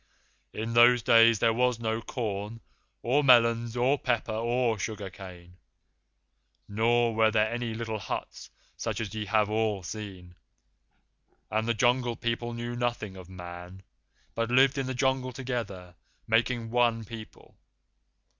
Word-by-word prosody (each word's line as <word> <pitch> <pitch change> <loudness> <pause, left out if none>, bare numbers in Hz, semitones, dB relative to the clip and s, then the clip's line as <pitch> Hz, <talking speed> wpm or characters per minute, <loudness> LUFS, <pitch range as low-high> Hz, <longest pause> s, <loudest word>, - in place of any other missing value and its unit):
"In 115 +2 -4
those 120 0 +6
days 115 0 +6
there 115 +2 +2
was 125 0 +1
no 110 0 -2
corn 110 -2 -4 0.4
or 135 +5 +2
melons 115 -2 +4
or 130 +4 +2
pepper 120 -4 -1
or 120 0 0
sugar 100 -1 -5
cane, 90 -2 -12 1.1
nor 115 +2 +2
were 110 0 +4
there 110 +1 +1
any 120 -2 -3
little 110 -1 -4
huts - - -6 0.3
such 110 -2 -3
as 110 -4 -4
ye 110 -1 -4
have 105 0 +2
all 105 -2 -1
seen; 95 -3 -8 1.2
and 110 +1 0
the 115 - +1
Jungle 120 +1 +2
People 120 +1 -3
knew 120 +1 -5
nothing 120 -5 -3
of 95 -1 -11
Man, 90 +1 -10 0.5
but 115 0 -2
lived 135 +2 +4
in 135 - -2
the 130 - -3
Jungle 130 0 0
together, 115 -8 -5 0.3
making 115 0 0
one 120 -2 +2
people. 110 +1 -11
115 Hz, 140 wpm, -28 LUFS, 105-120 Hz, 1.2 s, those